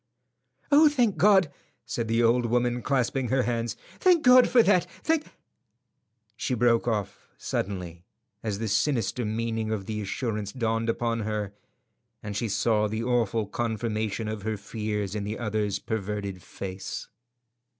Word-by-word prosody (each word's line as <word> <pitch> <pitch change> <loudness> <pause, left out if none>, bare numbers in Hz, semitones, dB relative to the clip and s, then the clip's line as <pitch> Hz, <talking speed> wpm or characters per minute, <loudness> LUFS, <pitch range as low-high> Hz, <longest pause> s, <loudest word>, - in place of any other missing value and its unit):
"Oh, 300 +2 +7
thank 245 - +1
God!" 190 -2 +5 0.3
said 115 -2 -3
the 115 +1 +2
old 120 +1 +3
woman, 120 +1 +1
clasping 130 0 0
her 130 +2 +2
hands. 115 -1 -2 0.2
"Thank 360 -4 +4
God 250 0 +7
for 240 -2 +6
that! 180 -4 +3 0.2
Thank—" 320 -1 +1 1.1
She 125 - -1
broke 120 0 +3
off 105 -4 -3
suddenly 90 -3 -4 0.4
as 105 -3 -2
the 110 +1 -3
sinister 115 +1 0
meaning 110 0 -2
of 105 -3 -2
the 105 0 -3
assurance 105 0 -3
dawned 115 -2 -1
upon 115 0 0
her 105 -2 -3 0.7
and 105 -1 -5
she 110 +2 -1
saw 105 +1 +2
the 110 +2 -3
awful 115 -3 +1
confirmation 110 -1 -2
of 110 -1 -4
her 110 +1 -2
fears 105 -2 -3
in 105 -1 -3
the 105 +2 -4
other's 105 -3 -1
averted 100 -3 -3
face. 95 +2 -6
115 Hz, 145 wpm, -27 LUFS, 105-125 Hz, 1.1 s, Oh